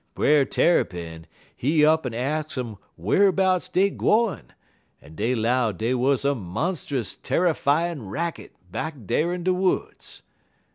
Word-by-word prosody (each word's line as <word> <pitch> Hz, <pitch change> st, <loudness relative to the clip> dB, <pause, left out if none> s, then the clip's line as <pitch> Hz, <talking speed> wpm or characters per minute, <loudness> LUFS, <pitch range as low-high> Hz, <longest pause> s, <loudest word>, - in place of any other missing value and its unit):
Brer 145 Hz, -2 st, +4 dB
Tarrypin, 85 Hz, -, 0 dB, 0.3 s
he 150 Hz, +3 st, +3 dB
up'n 155 Hz, -4 st, +2 dB
ax 150 Hz, +4 st, -2 dB
um 115 Hz, -6 st, -5 dB, 0.2 s
wharbouts 185 Hz, -, +2 dB
dey 195 Hz, +2 st, +3 dB
gwine, 220 Hz, -3 st, +1 dB, 0.5 s
en 75 Hz, +2 st, -16 dB
dey 115 Hz, +9 st, 0 dB
'low 120 Hz, 0 st, +1 dB
dey 110 Hz, +6 st, -1 dB
wuz 130 Hz, +2 st, +1 dB
a 140 Hz, -, +3 dB
monst'us 130 Hz, -, -3 dB
tarryfyin' 160 Hz, -, 0 dB
racket 170 Hz, -, -4 dB, 0.2 s
back 160 Hz, -1 st, -4 dB
dar 165 Hz, -, +1 dB
in 180 Hz, -1 st, -4 dB
de 185 Hz, +1 st, +2 dB
woods. 185 Hz, 0 st, -2 dB
145 Hz, 130 wpm, -24 LUFS, 115-175 Hz, 0.5 s, Brer